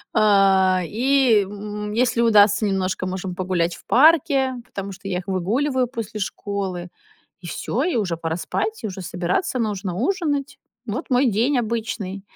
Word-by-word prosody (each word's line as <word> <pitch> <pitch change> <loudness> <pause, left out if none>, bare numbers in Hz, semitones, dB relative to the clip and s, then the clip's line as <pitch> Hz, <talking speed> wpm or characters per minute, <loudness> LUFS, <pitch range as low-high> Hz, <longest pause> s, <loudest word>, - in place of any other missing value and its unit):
А, 195 -3 +4
и, 245 - +3
м, 210 +1 -6
если 235 +1 +1
удастся 210 -2 +5
немножко, 190 -1 -1
можем 185 0 -4
погулять 180 -2 -1
в - - -16
парке, 275 -2 +4
потому 200 -5 -7
что 195 +1 -10
я 180 -2 -1
их 185 - -11
выгуливаю 245 +8 0
после 225 -3 -6
школы. 190 -3 -4 0.5
И 175 - -9
всё, 235 +8 -3
и 360 - 0
уже 190 -7 0
пора 165 0 -3
спать, 335 - -3
и - - -1
уже 190 -1 -7
собираться, 180 - -2
нужно 200 -5 -2
ужинать. 290 - -1 0.3
Вот 245 +8 -4
мой 255 +2 +3
день 240 +6 +1
обычный. 220 -4 -3
210 Hz, 155 wpm, -22 LUFS, 185-245 Hz, 0.5 s, удастся